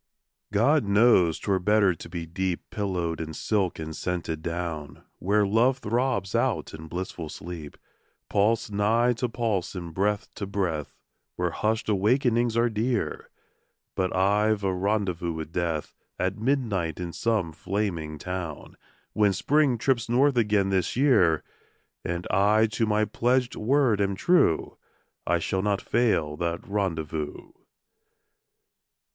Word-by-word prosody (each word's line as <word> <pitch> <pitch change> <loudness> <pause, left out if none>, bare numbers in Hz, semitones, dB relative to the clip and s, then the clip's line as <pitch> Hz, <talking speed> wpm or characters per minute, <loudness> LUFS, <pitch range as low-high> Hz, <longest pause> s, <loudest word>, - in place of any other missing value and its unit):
God 130 +9 +3
knows 100 -5 +4
'twere 95 -2 0
better 100 0 +3
to 80 - -11
be 85 -2 -5
deep 90 +2 -3
Pillowed 90 -6 -2
in 80 -1 -6
silk 100 -5 0
and 80 0 -6
scented 85 -3 -3
down, 80 -2 -5 0.2
Where 105 +2 +2
Love 115 +6 +3
throbs 120 -4 -1
out - - 0
in 80 +1 -9
blissful 85 -1 -5
sleep, 80 -2 -8 0.5
Pulse 110 +2 +1
nigh 115 +4 +2
to 120 +1 -2
pulse, 110 -6 -2
and 85 -3 -6
breath 100 +3 -1
to 100 - -5
breath, 90 -7 -2 0.4
Where 90 -1 -1
hushed 110 +4 -1
awakenings 115 +3 +2
are 120 +1 +4
dear... 115 +1 -2 0.6
But 95 -1 -1
I've 105 +2 +2
a 95 -1 +1
rendezvous 90 -3 -1
with 80 0 -6
Death 85 -3 -2 0.2
At 95 +2 -1
midnight 110 - 0
in 85 -2 -4
some 110 -8 0
flaming 85 -2 -3
town, 90 -2 -6 0.4
When 105 -2 +3
Spring 140 +5 +2
trips 120 -1 0
north 135 +3 +3
again 105 -4 +2
this 95 -3 0
year, 105 - +4 0.6
And 85 0 -3
I 105 +3 +4
to 115 0 0
my 105 0 +2
pledged 125 +2 +1
word 120 -2 +2
am 100 -1 0
true, 170 - +2 0.5
I 85 - +3
shall 95 +3 -1
not 100 0 +1
fail 95 -11 +1
that 85 0 -3
rendezvous. 80 -7 -3
100 Hz, 135 wpm, -26 LUFS, 85-110 Hz, 0.6 s, knows